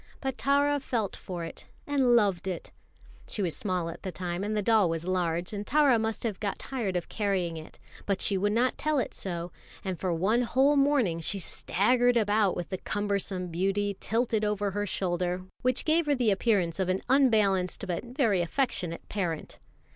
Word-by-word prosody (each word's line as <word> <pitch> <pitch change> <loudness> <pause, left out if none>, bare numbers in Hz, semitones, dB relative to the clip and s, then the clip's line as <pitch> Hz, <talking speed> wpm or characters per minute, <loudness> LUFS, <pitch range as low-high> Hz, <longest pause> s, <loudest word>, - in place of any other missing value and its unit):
But 265 -2 -3
Tara 285 +2 +2
felt 230 -7 -2
for 175 -2 -6
it 165 - -8 0.2
and 265 -4 +3
loved 200 -5 +2
it. 180 -3 -5 0.6
She 205 - -2
was 170 -4 -1
small 180 -4 -2
at 165 - -7
the 190 - -4
time, 180 0 -4
and 215 +1 -1
the 210 - 0
doll 215 -4 +4
was 165 0 -2
large, 180 0 -1
and 205 0 -3
Tara 280 -4 +4
must 220 0 -2
have 220 -5 -2
got 205 -2 -2
tired 230 -9 -3
of 175 - -2
carrying 190 -5 -1
it; 160 -1 -10 0.3
but 200 -2 +1
she 200 - +3
would 205 +2 +1
not 240 +4 +1
tell 305 0 +1
it 260 - -1
so, 175 -2 -4 0.3
and 185 -3 -3
for 185 - -1
one 195 +8 +2
whole 265 +4 +3
morning 275 - +2
she 180 +5 -1
staggered 245 +6 +2
about 210 -3 +2
with 175 - -5
the 185 - -4
cumbersome 200 -3 -2
beauty 195 +4 0
tilted 225 -1 0
over 205 -1 0
her 205 +1 -2
shoulder, 180 -1 -1 0.2
which 255 0 +1
gave 320 0 +2
her 290 - +3
the 240 -5 +2
appearance 195 -4 +1
of 185 -1 0
an 185 +1 0
unbalanced 215 -9 +3
but 175 -2 -3
very 240 - +1
affectionate 175 -4 -2
parent. 175 -6 -3
205 Hz, 190 wpm, -28 LUFS, 180-240 Hz, 0.6 s, doll